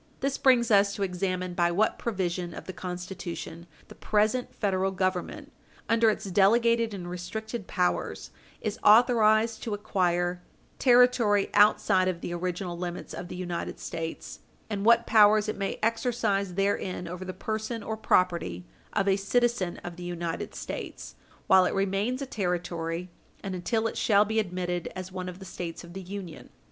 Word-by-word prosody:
This 275 0 -1
brings 245 -3 +4
us 200 -1 +4
to 200 - -2
examine 185 -1 -2
by 175 -1 +2
what 205 +5 +1
provision 180 -5 -2
of - - -8
the 185 - -6
Constitution 180 -2 -6 0.2
the - - -12
present 215 +4 0
Federal 190 -2 0
Government, 190 - -2 0.4
under 230 0 +4
its 215 - -2
delegated 230 +4 +3
and 185 -3 -6
restricted 195 +5 -5
powers, 180 -1 -1 0.3
is 215 0 -3
authorized 220 0 +5
to 220 -4 -2
acquire 175 -3 0 0.4
territory 245 -5 +4
outside 205 -2 +4
of 175 -2 -2
the 175 - -4
original 180 0 -3
limits 175 0 -5
of 175 - -6
the - - -7
United 175 -1 -4
States, 165 -1 -6 0.3
and 200 -1 -2
what 235 +1 +5
powers 215 -1 +5
it 215 - -2
may 195 - -3
exercise 225 -5 0
therein 195 -2 -1
over 180 +2 -6
the 185 - -5
person 220 +3 -4
or 220 - -3
property 170 - +1 0.3
of 200 -1 +1
a 195 0 +3
citizen 200 -3 0
of 175 0 -7
the 180 - -8
United 170 -1 -4
States - - -6 0.3
while 190 -1 +6
it - - -1
remains 200 +7 0
a - - -3
Territory 175 -5 -3 0.3
and 195 - -4
until 220 +5 -1
it 225 - -2
shall 205 -1 +4
be 220 +1 0
admitted 180 -3 -2
as 185 0 -6
one 185 -1 -5
of 180 - -9
the 190 - -11
States 170 -1 -6
of 170 0 -12
the 190 - -6
Union. 185 -3 -8
195 Hz, 165 wpm, -28 LUFS, 180-220 Hz, 0.4 s, while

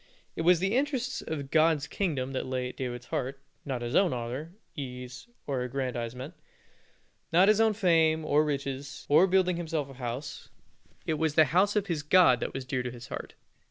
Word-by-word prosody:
It - - -3
was 175 +2 +5
the 195 +5 0
interests 265 -2 -1
of 140 -4 -5
God's 155 -2 +3
kingdom 140 -9 -2
that 130 - -3
lay 130 -1 -2
at - - -11
David's 120 -2 -5
heart 135 +3 -3 0.3
not 130 -3 -3
his 120 +3 -3
own 190 -6 +4
honor, 125 +7 -5 0.2
ease, 125 - -7 0.2
or 135 -3 -2
aggrandizement 125 +2 -4 1.0
not 180 +4 +5
his 215 +1 +5
own 220 -1 +4
fame 165 -6 +3
or 150 0 +3
riches, 140 -1 -4
or 160 +6 +6
building 185 -1 +2
himself 160 -5 -3
a - - -10
house 125 +3 -6 0.6
it 155 -2 -1
was 160 -2 0
the 160 - +7
house 195 +4 +3
of 210 -2 +1
his 165 -5 -2
God 150 -5 +5
that - - -3
was 135 -1 -6
dear 130 0 -1
to 125 - -4
his 120 -1 -10
heart. - - -7
145 Hz, 190 wpm, -29 LUFS, 130-175 Hz, 1.0 s, the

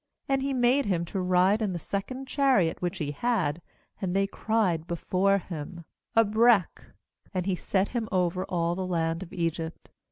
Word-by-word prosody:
^And 270 -1 +1
he 275 +1 -1
made 255 +2 +3
him 175 -4 0
to 190 +3 -3
ride 185 +4 +3
in 205 -4 0
the - - -2
second 230 +10 -4
chariot 260 - +2
which 175 -1 -2
he 145 -3 -2
had; 175 -3 0 0.4
and 185 -2 -1
they 195 0 +3
cried 195 -6 0
before 185 +3 +1
him: 170 -2 -7 0.3
'Abrech'; 225 -2 +4 0.5
and 180 -1 0
he 190 -1 +1
set 190 +2 0
him 230 -3 -3
over 180 -1 +1
all 170 -1 0
the 185 +1 -3
land 165 -1 -1
of 185 - -8
Egypt. 165 -1 -3
185 Hz, 170 wpm, -27 LUFS, 170-220 Hz, 0.5 s, Abrech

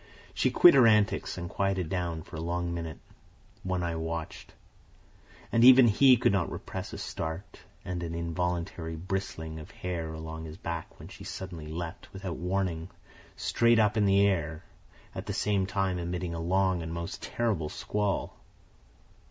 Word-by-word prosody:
She - - +2
quit 175 - +8
her 130 -4 +7
antics, 105 -2 +2
and 85 -1 -4
quieted 95 -1 -1
down 85 -2 -2
for - - -11
a 80 - -4
long 85 +1 -2
minute. 85 -2 -5 0.6
One 95 -1 -1
Eye 85 -1 -1
watched. 80 0 -5 1.0
And 115 - +4
even 130 0 +9
he 130 +4 +6
could 115 - +3
not 95 -4 0
repress - - -6
a - - -6
start 80 +5 -5 0.3
and 90 -1 -3
an 85 -1 -4
involuntary 85 -1 -2
bristling 80 -2 -4
of 75 - -10
hair 85 -3 -4
along 80 0 -6
his 80 0 -8
back 85 -1 -5
when - - -11
she - - -11
suddenly 85 -5 -7
leaped, 85 +4 -6
without 95 -4 -5
warning, 90 -1 -2 0.5
straight 115 0 +3
up 105 -1 +3
in 105 -2 +3
the 100 0 +5
air, 80 -5 0 0.5
at - - -6
the - - -2
same 100 -2 +1
time 95 -2 0
emitting 85 0 -3
a 85 - -4
long 95 +1 +1
and 80 0 -5
most 85 0 -5
terrible 105 -10 -1
squall. 105 -1 -2
90 Hz, 165 wpm, -29 LUFS, 80-100 Hz, 1.0 s, even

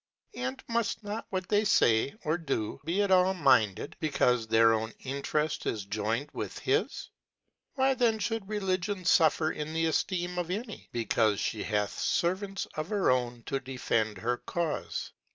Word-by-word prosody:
and 125 +2 -4
muft 230 -2 -1
not 210 +2 -5
what 185 -1 -3
they 205 +1 +3
fay 120 - +3
or 155 -1 +1
do 140 -11 -3
be 185 +5 +1
at 200 - 0
all 185 +1 +5
minded, 110 - +3
becaufe 125 -6 +2
their 115 0 +6
own 110 0 -1
Intereft 140 +3 -1
is 105 -3 -2
joyned 110 +7 -1
with - - -5
his? - - -1 0.6
Why 270 0 +3
then 235 -3 +2
(hould 220 -1 -3
Religion 195 -2 -1
fuifer 160 -2 +4
in 150 +1 -4
theefleem 175 +2 0
of 175 -1 -3
'any, 215 +4 -5
becaufe 110 -2 +1
the 110 - -6
hath 105 -2 -1
Servants 195 +3 0
of 155 +3 -4
her 205 -9 +2
own 120 -2 -1
to 135 - -2
defend 115 -5 -1
her 120 +5 -1
Caule 170 -3 -3
155 Hz, 155 wpm, -29 LUFS, 120-190 Hz, 0.6 s, their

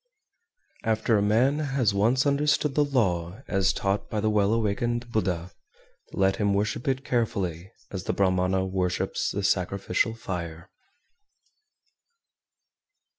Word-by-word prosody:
392. 115 - -3
After 110 0 +2
a - - +2
man 120 +8 +3 0.2
has 120 -7 +2
once 115 +7 +2
understood 145 0 +2
the 150 - +3
law 100 -6 -1
as 95 -1 +2
taught 100 +1 -2
by 110 - -2
the 110 +1 +1
Well 105 -1 +2
awakened 120 +2 -1
(Buddha), 90 -6 -1 0.6
let 95 0 +1
him 100 -1 +1
worship 105 +5 -1
it 130 0 0
carefully, 95 -7 -1 0.2
as 95 -2 -5
the - - 0
Brahmana 95 0 +1
worships 90 -1 -1
the 100 - -3
sacrificial 95 +4 0
fire. 85 -6 -6
100 Hz, 125 wpm, -26 LUFS, 95-120 Hz, 0.6 s, man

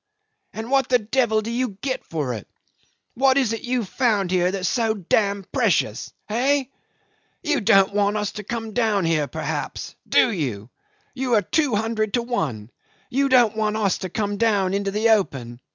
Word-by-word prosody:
And 225 +3 -6
what 270 -1 +2
the 250 - +5
devil 220 -1 +1
do 230 - -4
you 235 -4 -2
get 265 -2 -3
for 150 -6 -3
it; 110 - -7 0.7
what 265 +1 +3
is 255 -5 +2
it 225 - -4
you've 245 -4 -2
found 210 -6 +1
here 180 -1 +2
that 195 0 -3
is 185 - 0
so 225 -3 +1
d 195 -5 -11
d 200 -2 +2
precious? - - 0 0.2
Hey? 265 +4 +1 0.7
You 300 -5 +1
don't 195 -1 +4
want 205 +1 +1
us 210 -1 -2
to 210 - -7
come 225 +1 -5
down 215 -5 +1
here 155 -3 +1
perhaps - - -4 0.2
do 240 - +4
you? 125 - -4 0.4
You 255 -2 0
are 210 - +3
two 285 - +1
hundred 220 0 -1
to 240 - 0
one. 135 - -3 0.4
You 275 +2 +1
don't 240 -4 +4
want 215 -1 0
us 200 -4 +1
to 185 - -5
come 205 +2 -2
down 200 -4 +2
into 200 0 -1
the 215 +3 +1
open. 135 - 0
215 Hz, 185 wpm, -23 LUFS, 195-240 Hz, 0.7 s, the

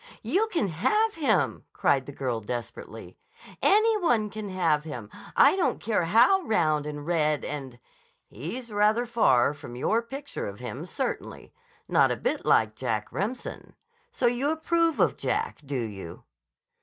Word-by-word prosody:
"You 365 - +1
can 340 - 0
have 425 - +1
him!" 265 - 0
cried 135 -2 +1
the - - -6
girl 125 -5 -3
desperately. 120 +2 -7 0.4
"Any 435 +1 +4
one 230 - +1
can 215 -1 -6
have 165 -5 +1
him! 120 -9 -7 0.2
I - - +6
don't 375 - 0
care 210 -5 0
how 240 - +5
round 155 - +1
and 145 -1 -6
red 155 -3 +1
and—" 135 -4 -6 0.5
"He's 220 - -7
rather 210 +3 +2
far 145 - +3
from 120 -4 -10
your 220 - +1
picture 270 +4 -6
of 100 0 -7
him, 125 -4 -6
certainly. - - -4 0.3
Not - - +4
a - - -1
bit - - -2
like 110 -1 +3
Jack 110 -3 -2
Remsen. 215 +7 -5 0.4
So 465 - -2
you 245 +4 +2
approve 330 +1 +1
of - - +3
Jack, 450 +2 -2
do 140 -2 -3
you?" 95 -6 -8
195 Hz, 155 wpm, -27 LUFS, -, 0.5 s, I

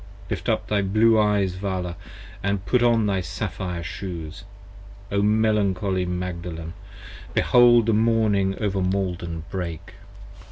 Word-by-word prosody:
Lift - - -2
up - - 0
thy 105 -1 +1
blue 110 +3 +3
eyes 105 -3 +2
Vala 90 -2 -3 0.4
& 100 -1 -3
put 125 +7 +2
on 115 -2 +3
thy 100 -2 0
sapphire 90 +1 -4
shoes: 90 0 -7 0.7
O 100 0 +1
melancholy 100 -3 +1
Magdalen, 85 -2 -5 0.6
behold 120 -2 +5
the 115 - +2
morning 105 -3 +2
over 100 -3 -1
Maiden 90 -3 -2
break! 90 -2 -5
95 Hz, 120 wpm, -24 LUFS, 90-105 Hz, 0.7 s, behold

